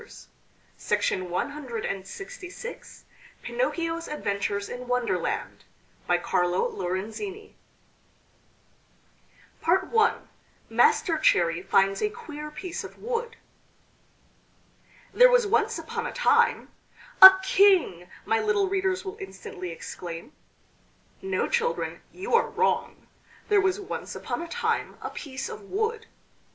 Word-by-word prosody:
ITALIAN 185 Hz, -1 st, -1 dB, 1.1 s
STORIES 400 Hz, +6 st, -9 dB, 0.4 s
PINOCCHIO'S 335 Hz, -9 st, -2 dB
ADVENTURES 200 Hz, -6 st, -2 dB
IN 250 Hz, 0 st, -7 dB
WONDERLAND 250 Hz, -1 st, -2 dB, 0.4 s
BY 175 Hz, -, +3 dB
CARLO 180 Hz, +1 st, +1 dB
LORENZINI 220 Hz, -, -5 dB, 2.1 s
I 450 Hz, -1 st, +3 dB, 0.6 s
MASTER 380 Hz, -8 st, +3 dB
CHERRY 170 Hz, -, +3 dB
FINDS 195 Hz, +1 st, +2 dB
A 425 Hz, -, +1 dB
QUEER 300 Hz, -10 st, -8 dB
PIECE 345 Hz, +3 st, -6 dB
OF -, -, -10 dB
WOOD 475 Hz, 0 st, -3 dB, 1.8 s
THERE -, -, +7 dB
was -, -, +4 dB
once 440 Hz, +2 st, +1 dB
upon 460 Hz, +1 st, -4 dB
a -, -, -5 dB
time... -, -, +2 dB, 0.5 s
"A 380 Hz, 0 st, +13 dB
king!" 375 Hz, -, +3 dB, 0.2 s
my 225 Hz, -, +2 dB
little 420 Hz, -2 st, +1 dB
readers 380 Hz, 0 st, -1 dB
will 385 Hz, +2 st, -6 dB
instantly 190 Hz, -, -8 dB
exclaim. 170 Hz, -, -8 dB, 0.9 s
No, 385 Hz, 0 st, -1 dB
children, 480 Hz, 0 st, -1 dB
you 385 Hz, +6 st, -6 dB
are 465 Hz, -, +4 dB
wrong. 460 Hz, -, -1 dB, 0.4 s
There 410 Hz, -1 st, +5 dB
was 380 Hz, +1 st, +1 dB
once 395 Hz, -, -6 dB
upon -, -, -4 dB
a 340 Hz, -, -6 dB
time 480 Hz, +8 st, -2 dB
a -, -, -6 dB
piece 270 Hz, -3 st, -6 dB
of -, -, -8 dB
wood. 445 Hz, +2 st, -2 dB
375 Hz, 105 wpm, -26 LUFS, -, 2.1 s, A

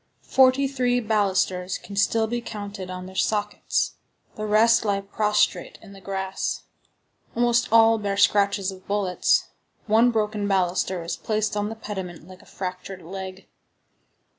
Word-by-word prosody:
Forty 265 Hz, +1 st, +4 dB
three 250 Hz, -2 st, +1 dB
balusters 190 Hz, -4 st, 0 dB
can 200 Hz, -, -11 dB
still 220 Hz, +3 st, +2 dB
be 240 Hz, +2 st, -3 dB
counted 205 Hz, -4 st, -7 dB
on 185 Hz, 0 st, -6 dB
their 190 Hz, -, -10 dB
sockets; 210 Hz, +1 st, -1 dB, 0.4 s
the 215 Hz, 0 st, -4 dB
rest 220 Hz, +2 st, +4 dB
lie 200 Hz, -2 st, 0 dB
prostrate 210 Hz, +1 st, 0 dB
in 200 Hz, -, -14 dB
the 195 Hz, -, -13 dB
grass. 190 Hz, 0 st, -3 dB, 0.7 s
Almost 240 Hz, -1 st, +2 dB
all 225 Hz, 0 st, +6 dB
bear 200 Hz, -1 st, -2 dB
scratches 200 Hz, -1 st, +3 dB
of 190 Hz, 0 st, -13 dB
bullets. 200 Hz, -3 st, +1 dB, 0.4 s
One 225 Hz, +3 st, +4 dB
broken 210 Hz, -2 st, -1 dB
baluster 185 Hz, -2 st, 0 dB
is 165 Hz, 0 st, -4 dB
placed 215 Hz, -1 st, -1 dB
on 205 Hz, 0 st, -1 dB
the 225 Hz, -, -6 dB
pediment 190 Hz, -6 st, -7 dB
like 185 Hz, -1 st, -13 dB
a -, -, -20 dB
fractured 185 Hz, 0 st, -6 dB
leg. 190 Hz, +2 st, -8 dB
205 Hz, 145 wpm, -24 LUFS, 190-220 Hz, 0.7 s, all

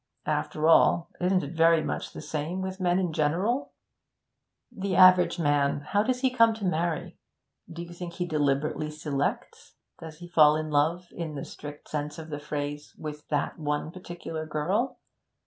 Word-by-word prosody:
After 155 Hz, +1 st, 0 dB
all, 165 Hz, +1 st, +5 dB
isn't 185 Hz, 0 st, +2 dB
it 140 Hz, -, -6 dB
very 165 Hz, -1 st, +4 dB
much -, -, -3 dB
the -, -, -8 dB
same 155 Hz, +5 st, -3 dB
with 190 Hz, 0 st, -5 dB
men 180 Hz, -1 st, +2 dB
in 180 Hz, -4 st, 0 dB
general? 180 Hz, -, 0 dB, 1.0 s
The 195 Hz, -2 st, -3 dB
average 180 Hz, -2 st, +6 dB
man 145 Hz, -3 st, +1 dB
how 200 Hz, +8 st, +1 dB
does 250 Hz, +3 st, -1 dB
he 260 Hz, -1 st, +2 dB
come 230 Hz, -3 st, +4 dB
to 215 Hz, -3 st, -5 dB
marry? 170 Hz, -2 st, -1 dB, 0.5 s
Do 170 Hz, +1 st, -6 dB
you 175 Hz, 0 st, -10 dB
think 175 Hz, 0 st, -7 dB
he 180 Hz, 0 st, -2 dB
deliberately 150 Hz, -1 st, 0 dB
selects? 150 Hz, -2 st, -3 dB, 0.2 s
Does 160 Hz, -2 st, -9 dB
he 175 Hz, +1 st, -10 dB
fall 155 Hz, -3 st, +6 dB
in 155 Hz, 0 st, -3 dB
love, 160 Hz, +5 st, +1 dB
in 160 Hz, -3 st, -5 dB
the 140 Hz, -, -5 dB
strict 145 Hz, 0 st, -10 dB
sense 150 Hz, 0 st, -4 dB
of 160 Hz, -1 st, -9 dB
the 145 Hz, -, -4 dB
phrase, 145 Hz, 0 st, -5 dB
with 150 Hz, -1 st, -7 dB
that 150 Hz, +2 st, -1 dB
one 150 Hz, +1 st, -2 dB
particular 170 Hz, -3 st, -7 dB
girl? 180 Hz, -, -1 dB
160 Hz, 170 wpm, -27 LUFS, 150-180 Hz, 1.0 s, average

